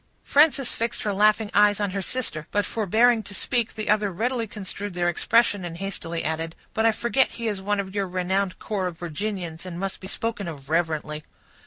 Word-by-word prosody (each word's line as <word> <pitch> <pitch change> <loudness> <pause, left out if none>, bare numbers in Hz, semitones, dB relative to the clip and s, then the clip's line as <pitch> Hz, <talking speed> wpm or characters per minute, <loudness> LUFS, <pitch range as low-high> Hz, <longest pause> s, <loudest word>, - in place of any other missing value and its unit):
Frances 280 -3 +4
fixed 230 0 -2
her 205 - 0
laughing 210 +1 +3
eyes 205 0 +5
on 205 -2 0
her 195 +1 -2
sister; 185 -8 -2
but 205 0 +1
forbearing 225 +2 +3
to 205 -1 -8
speak, 235 +5 0
the 215 -1 -4
other 210 -1 +2
readily 230 +5 -1
construed 205 -1 -6
their 175 -1 +1
expression, 205 +2 +3
and 170 -1 -5
hastily 170 -3 -4
added, 160 +1 -2 0.2
"But 220 +1 +3
I - - +6
forget 235 +4 +2
he 230 -1 -2
is 205 -3 -2
one 205 +1 0
of 190 -1 -4
your 200 -2 0
renowned 185 +1 0
corps 195 -4 -2
of 175 -2 -6
Virginians, 175 -1 -4
and 180 -2 -6
must 195 0 -3
be 190 - -8
spoken 215 -1 -3
of 145 -3 -8
reverently." 155 -2 0
200 Hz, 200 wpm, -25 LUFS, 175-220 Hz, 0.2 s, I